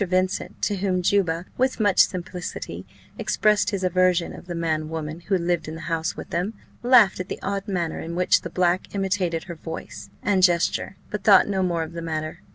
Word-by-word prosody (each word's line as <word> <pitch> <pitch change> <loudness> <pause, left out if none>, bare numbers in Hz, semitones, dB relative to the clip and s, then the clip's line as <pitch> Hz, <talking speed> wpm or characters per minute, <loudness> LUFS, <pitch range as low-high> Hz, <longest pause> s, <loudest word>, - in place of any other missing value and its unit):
Vincent, 185 0 -1
to 205 - +1
whom 185 -2 0
Juba, 175 -3 +1
with 260 -1 +1
much 205 -3 +2
simplicity, 180 -1 -1 0.3
expressed 210 -1 +2
his 200 -3 -3
aversion 185 -1 +2
of - - -11
the 175 - -4
man 155 -2 -1
woman 160 0 -5
who 190 +2 0
lived 175 -2 -1
in 155 - -5
the 160 - -8
house 165 -1 -2
with - - -8
them, 185 +6 -1 0.3
laughed 240 -7 +5
at 185 - -4
the - - -3
odd 200 +1 -2
manner 175 -5 -2
in 170 +1 -5
which 180 0 +3
the 170 - -6
black 180 +3 0
imitated 190 -4 0
her 175 - -7
voice 160 0 -8
and 190 -1 +2
gesture, 175 +1 +2 0.2
but 210 -1 -4
thought 195 -3 +7
no 195 -2 0
more 170 -3 0
of 160 +1 -8
the 170 - -5
matter. 155 -1 -4
180 Hz, 200 wpm, -24 LUFS, 170-195 Hz, 0.3 s, thought